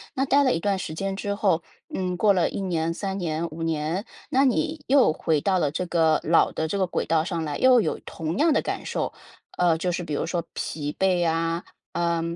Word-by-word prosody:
那 270 - +1
待 280 +2 +4
了 260 - +3
一 - - -1
段 200 +2 0
时 170 -4 -5
间 195 +4 -3
之 200 +1 -2
后， 190 -5 +1 0.3
嗯， 185 -1 -1
过 205 +2 +4
了 180 -3 +2
1 - - -4
年、 165 -3 -1
3 195 +2 -3
年、 165 -2 -2
5 165 +1 -6
年， 165 +5 -1 0.2
那 270 +2 +3
你 310 +3 0
又 265 - +5
回 155 -1 0
到 190 +2 +2
了 150 -5 +1
这 180 +4 -3
个 165 -2 +3
老 165 +1 +4
的 160 - -2
这 200 - -2
个 190 - +2
轨 175 - -2
道 160 -1 +2
上 170 -1 -3
来， 150 -2 -3
又 255 -2 +6
有 - - -2
同 165 +3 -4
样 315 0 +4
的 - - +2
感 - - -4
受。 - - -2 0.5
呃， 175 -2 +4
就 180 +1 0
是 175 0 -2
比 155 - -5
如 145 - -1
说 170 0 -1
疲 150 -1 -4
惫 190 -1 +3
呀， 165 0 0 0.3
呃， 170 0 0
175 Hz, 235 characters per minute, -25 LUFS, 160-200 Hz, 0.5 s, 又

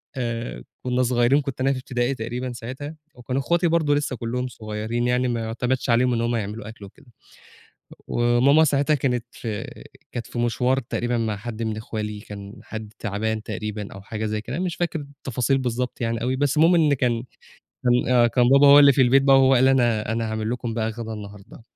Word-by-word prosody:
آآ، 120 -2 -4 0.2
كنّا 125 0 +1
صغيِّرين، 125 +3 +3
كنت 135 -2 -5
أنا 135 +1 +3
في 130 - -4
ابتدائي 125 +1 -1
تقريبًا 120 +2 -4
ساعتها، 130 +7 -7 0.2
وكانوا 125 +2 -3
أخواتي 170 +3 +1
برضه 160 -3 +2
لسَّه 145 -3 -1
كلُّهم 125 +2 -3
صغيِّرين 110 +1 -3
يعني، 125 +1 +1
ما 120 -1 -1
يُعتمَدش 125 +3 -2
عليهم 125 +1 +3
إن 115 - 0
هُم 120 0 0
يعملوا 105 0 -4
أكل 105 -3 -11
وكده. 95 - -17 1.0
وماما 120 +6 +4
ساعتها 145 +1 +2
كانت 125 -3 -1
في 110 -4 -5 0.5
كانت 120 -2 -5
في 120 - -6
مِشوار، 125 +3 +1
تقريبًا 120 0 -2
مع 110 -3 -1
حد 115 +1 -6
من 110 -1 -2
أخوالي، 105 -1 -5
كان 100 -1 -9
حد 110 -1 -8
تعبان 110 +1 -2
تقريبًا 105 -1 -5
أو 100 - -10
حاجة 110 +2 -5
زي 105 0 -2
كده، 125 +9 -5
مش 180 -3 -2
فاكر 170 -2 -2
التفاصيل 135 -2 -2
بالضبط 125 -1 -3
يعني 115 0 -1
أوي. 130 +2 0
بس 140 +1 0
المهم 165 +3 +5
إن 155 -3 +4
كان 120 -3 0 0.6
كان 125 +1 +2
آه، 120 -1 +6
كان 120 +1 +2
بابا 140 +2 +6
هو 140 +1 +9
اللي 140 -1 +8
في 130 - +3
البيت 135 +2 +5
بقى، 135 -1 +6
هو 135 0 +5
قال: 130 +1 +5
"أنا 120 -4 +2
أنا 115 0 -1
هاعمل 110 0 -2
لكم 120 -2 -3
بقى 110 -1 -1
غدا 115 0 -6
النهارده." 105 +1 -10
120 Hz, 200 wpm, -23 LUFS, 110-135 Hz, 1.0 s, هو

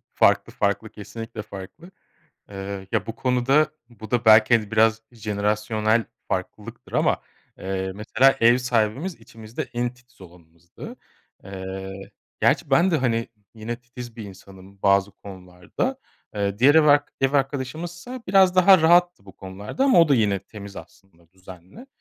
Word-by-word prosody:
Farklı, - - +2
farklı, 100 +2 -1
kesinlikle 115 +1 -8
farklı. 100 - -11 0.6
Iıı, 95 -1 -7
ya, - - 0
bu 115 - -5
konuda, 130 +4 +2 0.2
bu 110 -3 -12
da 120 -1 0
belki, 110 +1 +6
hani, 105 -3 -6
biraz 110 +1 +2
jenerasyonel 105 +1 -1 0.2
farklılıktır, - - -6
ama, - - +1 0.4
ııı, 95 0 -4
mesela, 120 +6 +2
ev 120 +2 +5
sahibimiz, 125 - -1
içimizde 115 -1 -9
en 120 +1 -2
titiz 125 -1 -27
olanımızdı. 85 -1 -13 0.5
Iıı, 95 0 -8 0.3
gerçi - - +1
ben 170 +8 +4
de, 165 - +2
hani, 115 -4 -1 0.3
yine 115 +2 -5
titiz 120 -1 -11
bir 110 - -7
insanım 95 0 -14
bazı 100 0 +3
konularda. 95 - -6 0.4
Iıı, 100 -1 -2
diğer 135 +5 +5
ev 160 -1 +6
ark 145 -1 +3
ev 135 0 +1
arkadaşımızsa, 155 - -3
biraz 190 -1 +4
daha 185 0 +7
rahattı 175 - +3
bu 95 - -15
konularda, 100 - -4
ama 265 -10 +5
o 165 - +4
da, 140 - +4
yine 105 -5 +1
temiz 100 +1 -12
aslında, 85 -4 -15
düzenli. 95 - -14
110 Hz, 145 wpm, -23 LUFS, 100-135 Hz, 0.6 s, daha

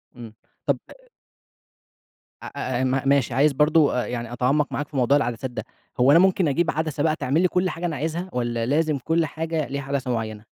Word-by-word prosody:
امم، 115 -3 -10 0.3
طب - - +2 1.7
أ - - -7
أ 130 -1 -3
أ - - +1
م 130 +1 +1
ماشي 140 -3 +2
عايز 140 +4 +3
برضه 150 +1 +3
آآ، - - -4
يعني 120 -1 -5
أتعمّق 135 +5 +1
معاك 145 - -3
في 150 - -14
موضوع 130 +3 +4
العدسات 120 -1 -2
ده، 120 - -5 0.4
هو 125 +3 +5
أنا 165 - +7
ممكن 185 -1 +3
أجيب 160 +3 +1
عدسة 155 -1 -2
بقى 155 -1 +2
تعمل 145 +3 0
لي 185 - +4
كل 180 +1 0
حاجة 170 +1 -5
أنا 165 -3 -2
عايزها؟ 165 +5 -3
والَّا 120 -2 -1
لازم 150 +3 +1
كل 165 +5 0
حاجة 160 0 -3
ليها 140 0 -4
عدسة 135 -2 -2
معيّنة؟ 110 -2 -3
140 Hz, 205 wpm, -23 LUFS, 125-160 Hz, 1.7 s, أنا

